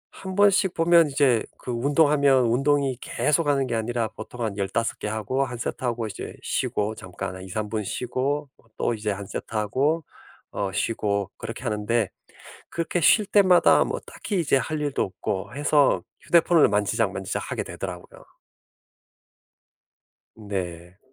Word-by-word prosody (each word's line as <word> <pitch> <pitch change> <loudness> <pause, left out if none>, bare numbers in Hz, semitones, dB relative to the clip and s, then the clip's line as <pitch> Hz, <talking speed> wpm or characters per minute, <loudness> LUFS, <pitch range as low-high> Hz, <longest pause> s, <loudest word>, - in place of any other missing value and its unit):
1 190 -1 -7
번씩 200 -2 +4
보면 165 -2 +5
이제 135 -5 +3
그 125 - -6
운동하면 140 0 +3
운동이 135 +2 +2
계속하는 145 -3 +1
게 125 - -3
아니라 115 0 -1
보통 120 +2 -8
한 105 -3 -2
15 100 +3 -1
개 - - -4
하고 110 +6 -1
1 125 -2 -5
세트하고 120 -1 -2
이제 100 -3 -7
쉬고 105 +1 -1
잠깐 95 -2 -7
한 95 - -9
2-3 100 +3 -4
분 105 0 -2
쉬고 135 +7 -2
뭐 - - -27
또 - - 0
이제 105 -1 -3
1 100 0 -3
세트 110 - -7
하고 140 +10 +1 0.5
어 100 -2 -2
쉬고 100 -2 -1
그렇게 115 +2 -6
하는데 110 -2 0 0.6
그렇게 170 +1 -2
쉴 210 +8 +5
때마다 190 -3 +5
뭐 - - -3
딱히 200 -4 -4
이제 150 -5 +2
할 155 +4 -2
일도 145 -2 -1
없고 95 +4 -3
해서 145 -1 +3 0.2
휴대폰을 170 -2 +4
만지작만지작하게 105 -2 -1
되더라고요. - - -8 2.2
네. 90 -3 -5
120 Hz, 275 characters per minute, -25 LUFS, 105-145 Hz, 2.2 s, 보면